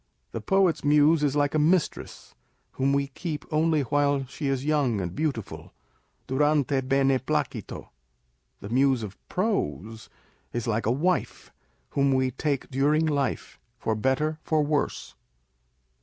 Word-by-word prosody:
The 115 - -5
poet's 190 - +2
Muse 150 +2 +4
is 145 -1 +1
like 145 -1 +1
a 155 - +2
mistress, 165 +2 0 0.4
whom 135 +1 0
we 140 0 +2
keep 150 +2 -5
only 155 0 +2
while 140 +1 +1
she 140 +3 -5
is 135 0 -1
young 145 -8 +1
and 90 -2 -4
beautiful, 110 - -4 0.5
durante 145 0 +1
bene 135 0 +2
jjlacito; - - -3 0.7
the 100 - -7
Muse 130 0 +2
of 100 -2 -7
prose 110 - -2 0.4
is 120 -2 -2
like 115 -1 -1
a - - +3
wife, 170 +8 -1 0.4
whom 140 -1 +2
we 130 -1 +1
take 140 +1 -2
during 145 +4 +2
life, 145 -3 -2 0.2
for 110 - -1
better 135 +8 0
for 155 -1 +1
worse. 145 0 -2
140 Hz, 140 wpm, -26 LUFS, 130-155 Hz, 0.7 s, Muse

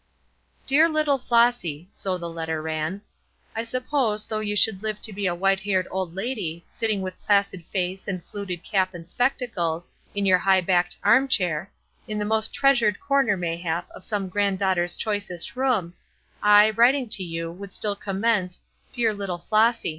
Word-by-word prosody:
"Dear 310 +5 +5
little 305 -3 +1
Flossy," 235 -10 +1
so 185 -2 -2
the 170 -1 -6
letter 160 -1 -3
ran, 160 +5 -3 0.5
"I 225 - -1
suppose, 235 -3 -1
though 215 - -3
you 210 -1 -2
should 205 -2 +3
live 215 -1 -3
to 220 - -1
be 200 0 -2
a 175 - 0
white 195 +2 +2
haired 190 -2 0
old 185 -2 -3
lady, 195 -7 -4
sitting 215 -4 -2
with 185 0 -7
placid 200 -3 +1
face 185 +1 -3
and 185 -3 -4
fluted 185 -4 -6
cap 190 -3 0
and 165 -1 -9
spectacles, 185 -8 -1 0.2
in 200 0 0
your 185 -1 +5
high 190 0 +4
backed 180 0 +1
arm 270 +1 +5
chair, 180 - 0 0.4
in 215 -1 -3
the 210 - -1
most 220 +1 +1
treasured 240 -7 +3
corner 275 -8 +2
mayhap 170 0 -3
of - - -11
some 205 -3 -2
granddaughter's 190 -2 +1
choicest 205 -5 -3
room, 245 -10 0 0.5
I, 210 +1 +6
writing 245 +4 +3
to 205 -4 +3
you, 165 -1 -4
would 195 +3 -10
still 205 0 0
commence 195 -2 -1 0.3
'Dear 230 -4 +1
little 200 -3 -4
Flossy.' 220 +6 +2
200 Hz, 170 wpm, -24 LUFS, 180-220 Hz, 0.5 s, I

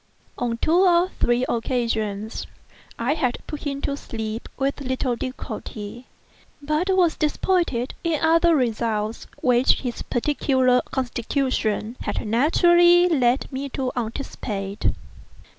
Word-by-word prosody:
On 235 -1 -2
two 320 +8 +2
or 360 -1 +4
three 240 +1 +2
occasions 220 -3 -2 0.5
I 240 +5 +1
had 255 -6 0
put 300 0 -7
him 280 0 -3
to 280 - -1
sleep 220 -4 -5
with 275 +1 -1
little 260 -1 -1
difficulty, 235 -2 -7 0.5
but 305 +5 -1
was 365 -4 +3
disappointed 305 -5 0
in 330 -3 0
other 330 +1 +4
results 225 -4 -1 0.2
which 250 0 +4
his 245 -3 -4
peculiar 260 -1 +2
constitution 245 -3 -1
had - - -3
naturally 345 - +5
led 260 -5 +2
me 275 +1 -4
to 260 -1 -2
anticipate. 220 -4 -4
255 Hz, 115 wpm, -23 LUFS, 235-300 Hz, 0.5 s, naturally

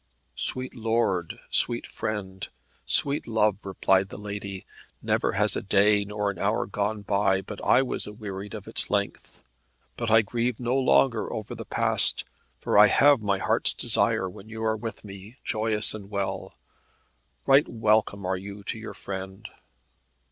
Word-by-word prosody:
"Sweet 130 0 -1
lord, 110 -7 -1
sweet 120 0 +2
friend, 95 -3 -5 0.4
sweet 140 +1 +2
love," 110 -2 +1
replied 95 0 +1
the - - -8
lady, 100 -2 -6 0.3
"never - - 0
has - - +2
a - - -2
day 100 +1 +3
nor 105 0 -2
an 95 - -11
hour 105 +4 0
gone 105 +1 -2
by 100 -1 +2
but 105 +1 -9
I 135 - +4
was 130 - -1
awearied 105 -2 -7
of - - -9
its - - 0
length. - - -3 0.5
But 115 -1 -2
I 110 0 +6
grieve 120 +2 -2
no 125 +1 -1
longer 130 -3 +2
over 110 - -5
the - - -8
past, - - +2 0.3
for - - +2
I 105 - +9
have 140 +2 +5
my 100 -2 0
heart's - - +1
desire 95 - +1
when 95 +4 -11
you 110 0 -6
are 110 0 +1
with 110 +1 -7
me, 100 +4 -11
joyous 110 -1 0
and 100 -2 -9
well. 100 -2 -4 0.9
Right 135 +2 +5
welcome 110 -3 +1
are 95 0 0
you 100 +2 -9
to 110 - -4
your 110 - -8
friend." 95 0 -7
105 Hz, 160 wpm, -26 LUFS, 100-110 Hz, 0.9 s, I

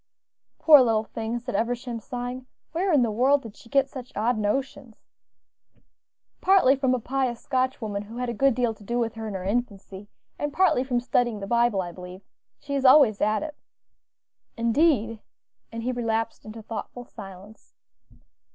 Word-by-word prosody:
"Poor 300 -4 +8
little 225 -3 +2
thing!" 225 +1 -4
said 245 +1 -6
Eversham, 235 +2 -2
sighing; 245 +2 -6 0.2
"where 360 +3 0
in 285 -6 +4
the 230 - 0
world 270 +6 +3
did 225 -3 -10
she 230 - -17
get 275 0 +3
such 260 -1 -9
odd 235 +4 +1
notions?" 225 +2 -3 1.4
"Partly 370 -9 +5
from 260 -2 +1
a - - -2
pious 255 -1 -2
Scotch 260 -1 -1
woman, 205 -4 -4
who 220 +3 -10
had 250 0 -2
a 235 - -2
good 270 +2 +2
deal 240 -2 0
to 215 - -17
do 235 +4 -2
with 230 -2 -1
her 225 -1 -6
in 205 - -5
her 185 - -4
infancy, 200 -2 -4 0.3
and 295 - -2
partly 365 -7 +3
from 250 -2 0
studying 240 -2 0
the 200 - -5
Bible, 235 -3 +2
I 175 - -7
believe. 180 +1 -10 0.4
She 280 -1 -7
is 275 -1 0
always 255 -6 +6
at 215 +5 +1
it." 305 -1 -6 1.0
"Indeed!" 230 -2 +2 0.5
and 230 0 -6
he 255 - -1
relapsed 225 -2 -2
into 220 +1 -9
thoughtful 235 +2 -7
silence. 200 -1 -13
240 Hz, 175 wpm, -25 LUFS, 215-260 Hz, 1.4 s, Poor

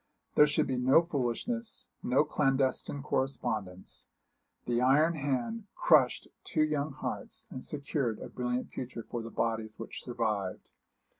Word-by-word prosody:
There 150 - +7
should 150 - +2
be 130 - -1
no 130 +6 +5
foolishness, 170 - -2
no 130 +4 +3
clandestine 135 -1 +1
correspondence. 110 -10 -2 0.6
The 120 0 +1
iron 150 +6 +5
hand 160 - -2
crushed 145 -7 +4 0.2
two 155 - +1
young 150 -1 0
hearts, 220 - -5
and 130 - -6
secured 140 -5 -2
a - - -7
brilliant 125 0 -2
future 120 -2 -5
for 120 - -4
the 115 - -6
bodies 110 -1 -2
which 115 - -7
survived. 110 -6 -2
130 Hz, 135 wpm, -31 LUFS, 120-150 Hz, 0.6 s, There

